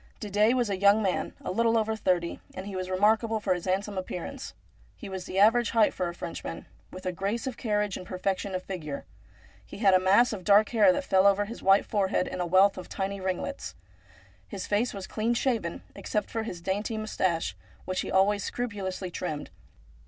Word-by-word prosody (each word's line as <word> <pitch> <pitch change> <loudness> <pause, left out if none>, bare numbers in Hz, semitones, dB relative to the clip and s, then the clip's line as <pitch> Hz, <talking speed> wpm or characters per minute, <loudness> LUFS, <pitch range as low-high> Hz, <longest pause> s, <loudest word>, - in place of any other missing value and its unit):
Didet 210 +3 +2
was 240 -5 +1
a 190 - -2
young 200 +2 +5
man, 190 -2 -1
a - - -4
little 230 +3 +2
over 220 0 0
thirty, 180 -5 0 0.2
and 185 - -6
he 200 -1 -6
was 185 0 -3
remarkable 220 +4 +2
for 200 -3 +1
his 180 -1 -5
handsome 195 +1 -1
appearance. 185 +9 -6 0.4
He 220 - -9
was 190 -2 -6
the 190 - -5
average 225 +4 +5
height 225 -2 +3
for 180 -1 -2
a - - -6
Frenchman, 170 - -6 0.2
with 185 0 -10
a 185 - 0
grace 200 +6 -2
of 260 -3 -3
carriage 210 -4 -1
and 180 - -9
perfection 190 +1 -2
of 185 - -3
figure. 155 -7 -6 0.6
He - - -11
had 200 -2 +4
a 185 - +6
mass 200 +6 +4
of 190 -4 -6
dark 205 +3 +5
hair 230 +3 +5
that 285 +1 -1
fell 190 -6 +4
over 200 +1 +3
his 230 +3 -8
white 195 +1 +5
forehead 195 -3 0
in 180 - -4
a 175 - -1
wealth 190 +2 +4
of 180 - -10
tiny 195 0 -3
ringlets. 185 -1 -3 0.7
His 195 -2 -6
face 210 +4 +1
was 195 -2 -6
clean 225 +4 -1
shaven, 230 -10 -1
except 210 -2 -3
for 225 - -1
his 180 -6 -6
dainty 205 +5 -2
moustache, 185 -6 -1 0.3
which 185 - -2
was - - -5
always 200 +1 +3
scrupulously 195 -6 -4
trimmed. 155 -4 -4
200 Hz, 205 wpm, -28 LUFS, 185-220 Hz, 0.7 s, a